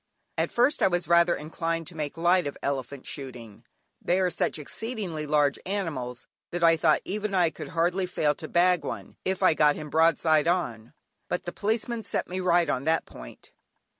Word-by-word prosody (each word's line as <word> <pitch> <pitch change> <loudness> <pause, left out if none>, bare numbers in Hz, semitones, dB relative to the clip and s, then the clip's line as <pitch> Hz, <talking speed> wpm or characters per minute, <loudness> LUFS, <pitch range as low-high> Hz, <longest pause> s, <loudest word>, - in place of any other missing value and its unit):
At - - -1
first 250 +5 +2
I - - +6
was 175 -3 -1
rather 170 0 +4
inclined 165 +2 -3
to 180 - -5
make 150 -1 -4
light 175 0 +3
of 140 - -6
elephant 140 -1 -3
shooting, 120 -7 -9 0.4
they 180 +2 +1
are 185 -1 +1
such 165 - -1
exceedingly 175 - -5
large 145 -2 +2
animals 145 -11 -4 0.2
that 175 0 -3
I 165 0 +6
thought 160 - +3
even 210 0 -2
I 175 -3 +3
could - - -8
hardly 175 +3 0
fail 150 -4 +1
to 155 - -7
bag 175 -1 +3
one 100 -8 -7
if 190 0 -1
I 185 - +6
got 150 -1 +4
him 150 -1 -8
broadside 160 -1 +3
on; 120 -11 -1 0.4
but 180 - -2
the 175 - -6
Policeman 225 +2 -1
set - - -3
me 185 +1 -4
right 175 -2 +3
on 130 +2 -1
that 160 +1 +1
point. - - -12
165 Hz, 190 wpm, -27 LUFS, 150-180 Hz, 0.4 s, I